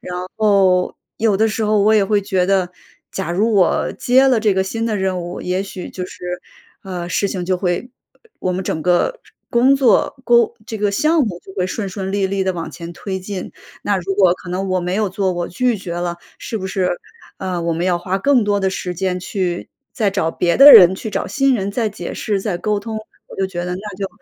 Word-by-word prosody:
然 180 - -4
后， 195 -4 +3 0.2
有 215 -3 +2
的 220 +2 +3
时 220 +1 -2
候， 210 0 +2
我 215 +2 +4
也 215 -2 +4
会 205 +1 +2
觉 190 -3 0
得 190 -2 +1 0.4
假 190 -3 -3
如 215 +6 +1
我 190 -5 +2
接 260 +2 +4
了 255 -3 +3
这 215 -2 +2
个 190 - +2
新 225 +4 -3
的 220 -2 -1
任 190 -2 -1
务， 175 0 -6
也 180 +1 -1
许 195 -2 -8
就 180 -1 -5
是， 180 -1 -6 0.4
呃， 180 -2 -5
事 180 +3 0
情 185 -3 -3
就 185 +1 0
会 180 +7 -2 0.5
我 185 - -1
们 185 +1 -2
整 160 - -2
个 180 - +1 0.3
工 250 +3 +4
作、 270 -3 +3
沟 470 -2 +4
这 220 - -5
个 205 0 +1
项 310 +9 +2
目 185 -8 -3
就 190 - -11
会 180 -1 0
顺 200 +2 -3
顺 190 0 -5
利 200 -1 +1
利 195 0 -1
地 190 - +1
往 170 -2 -5
前 170 0 -8
推 190 +2 -5
进。 190 0 -6 0.3
那 205 - +1
如 190 +1 -2
果 190 -3 +5
可 180 - -13
能 190 +2 -2
我 185 0 +1
没 180 +1 -2
有 210 0 +1
做， 190 0 -1
我 175 -1 -3
拒 245 +5 0
绝 185 -3 -6
了， 175 0 -3 0.2
是 225 - -5
不 190 -3 -4
是， 190 -1 0 0.5
呃， 185 -2 -3
我 170 0 0
们 165 +2 -2
要 180 -1 +1
花 185 +2 -2
更 255 +1 +3
多 205 -1 +1
的 190 -1 +1
时 180 -1 -4
间 180 +1 -1
去 180 -2 -3 0.3
再 215 -6 +1
找 190 -4 0
别 170 +1 0
的 280 +1 +10
人 180 0 +9
去 205 - -6
找 - - -2
新 275 -1 +2
人 200 -4 -2
再 220 +1 -1
解 185 -4 -7
释 205 -2 -1
再 190 -3 -2
沟 210 +3 0
通。 220 +1 -5 0.3
我 - - -11
就 195 - 0
觉 175 -2 -5
得 180 - -3
那 200 +1 -7
就 195 0 -2
190 Hz, 250 characters per minute, -19 LUFS, 180-215 Hz, 0.5 s, 的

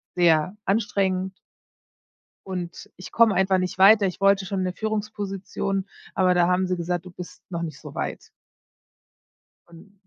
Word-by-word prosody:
sehr 175 +1 +3
anstrengend. 195 -2 0 1.1
Und 180 -2 -6
ich 185 - -10
komme 225 -3 +4
einfach 190 0 +3
nicht 185 0 -3
weiter. 200 +1 +7
Ich 185 - -4
wollte 195 0 +4
schon 195 -1 -2
'ne 185 - -1
Führungsposition, 200 -2 -3 0.3
aber 185 -1 +3
da 175 -1 +4
haben 180 +1 +2
sie 180 0 -1
gesagt: 175 +1 -3
„Du - - -8
bist 175 0 -10
noch 170 -2 -3
nicht 155 -4 -6
so - - -10
weit.“ - - -5 1.4
Und 170 +4 -16
185 Hz, 150 wpm, -24 LUFS, 180-195 Hz, 1.4 s, weiter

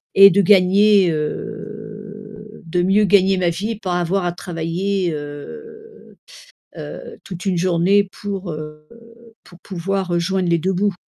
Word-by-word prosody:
et 195 0 +10
de 200 +2 +3
gagner, 195 0 +5
heu, 210 +5 -7
de 175 +2 -1
mieux 200 +3 +3
gagner 195 0 +4
ma 175 -2 +1
vie 200 +7 -3
et 215 - -6
pas 180 -3 -2
avoir 180 +2 -1
à 175 - -1
travailler, 175 +1 -2
heu, 440 - -10 0.6
heu, - - -9
toute 180 0 -8
une 185 -2 +1
journée 185 +3 +2
pour, 195 -3 -5
heu, 150 0 -9 0.6
pour 175 - -16
pouvoir, 190 0 -3
heu, - - +2
joindre 185 0 -1
les 170 - +3
2 190 +4 -1
bouts. 200 +1 0
190 Hz, 150 wpm, -20 LUFS, 175-205 Hz, 0.6 s, et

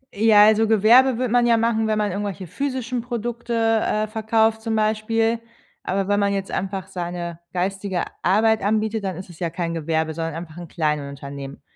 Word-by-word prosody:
Ja, 210 0 +6
also 220 +1 +4
Gewerbe 230 +4 +5
würde 250 -2 -1
man 245 0 +4
ja 230 -1 +4
machen, 225 -1 +1
wenn 215 - +1
man 210 -2 0
irgendwelche 200 -1 -4
physischen 255 - -3
Produkte, 235 0 -4 0.3
äh, 215 0 0
verkauft 220 +1 +1
zum 225 -1 -2
Beispiel, 220 +1 +1 0.4
aber 195 +1 -2
wenn 205 0 +2
man 200 0 +1
jetzt 195 -1 -3
einfach 190 -1 -3
seine 175 -1 -5
geistige 190 0 -2 0.2
Arbeit 220 +4 +3
anbietet, 215 +1 0
dann 190 -2 -3
isses 180 -3 -10
ja 170 -2 -1
kein 170 0 -3
Gewerbe, 160 0 -1
sondern 165 0 -4
einfach 165 -1 -8
'n 175 -1 -8
Kleinunternehmen. 140 -3 -4
205 Hz, 175 wpm, -22 LUFS, 175-225 Hz, 0.4 s, Ja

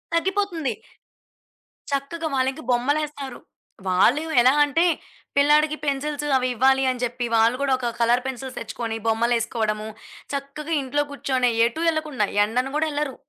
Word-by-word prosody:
తగ్గిపోతుంది. 355 -4 0 1.2
చక్కగా 280 +4 -2
వాళ్లకి 265 0 0
బొమ్మలేస్తారు. 275 +1 -1 0.5
వాళ్ళు 220 +11 +3 0.2
ఎలా 250 +2 +6
అంటే, 295 +3 +2 0.5
పిల్లాడికి 300 +2 +4
పెన్సిల్సు 290 +1 -2
అవి 255 -1 0
ఇవ్వాలని 260 0 +2
జెప్పి, 245 0 -2
వాళ్ళు 225 +2 +4
గూడా 275 -1 +2
ఒక 250 -1 -3
కలర్ 235 +1 +3
పెన్సిల్స్ 265 0 -5
తెచ్చుకొని 225 -2 -4
బొమ్మలేసుకోవడము, 225 -1 0 0.5
చక్కగా 280 +3 -4
ఇంట్లో 285 +2 0
కూర్చొనె 260 -3 0 0.2
ఎటూ 240 +8 -2
ఎళ్ళకుండా, 305 -9 -1 0.2
ఎండన 245 +5 0
గూడా 315 +1 +1
ఎళ్లరు. 290 -3 -2
265 Hz, 120 wpm, -23 LUFS, 240-295 Hz, 1.2 s, ఎలా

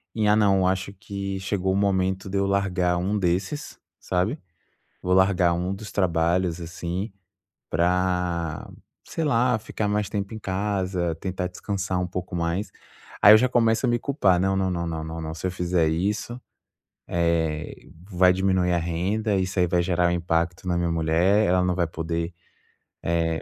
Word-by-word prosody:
em: 110 -2 +1
"Ah, 105 - +5
não, 100 -3 +4
eu 95 - +2
acho 95 +1 -1
que 100 -1 -5
chegou 95 0 -1
o - - 0
momento 95 -1 0
de 100 - -2
eu 100 - +2
largar 95 -3 +1
um 95 +4 0
desses, 95 - -2 0.2
sabe. 95 - -1 0.6
Vou 90 - 0
largar 95 -2 +4
um 90 +3 -1
dos 100 +1 -9
trabalhos, 85 -1 +1
assim, 90 +4 -4 0.6
pra, 90 -1 0 0.3
sei 165 - -3
lá, 125 -3 +2
ficar 105 -1 -3
mais 105 0 0
tempo 100 -1 -3
em 110 - -5
casa, 95 -3 -1
tentar 90 +1 -3
descansar 95 0 -3
um 90 - -1
pouco 90 0 -5
mais". 85 +4 -1 0.5
Aí 105 - +10
eu - - +8
já 125 +3 +2
começo 115 -1 +2
a - - +1
me 120 0 +2
culpar: 110 -10 +2
"Não, 95 +1 +1
não, 95 -1 +1
não, 85 -1 -2 0.2
não, 80 0 -5
se 80 - -10
eu - - 0
fizer 90 -2 +1
isso, 105 +9 -2 0.7
eh, 80 -3 0 0.4
vai 90 -1 +4
diminuir 95 -1 +1
a - - +2
renda. 95 +6 -1
Isso 95 +1 -2
aí 90 - +5
vai 85 0 +2
gerar 90 0 +1
um - - 0
impacto 85 +1 -1
na 90 - +1
minha 85 -1 0
mulher. 85 +6 +2
Ela 90 +1 +3
não 90 - +1
vai 85 -2 +1
poder, 85 +1 -3 0.7
eh 85 -1 0
90 Hz, 175 wpm, -25 LUFS, 85-100 Hz, 0.7 s, Aí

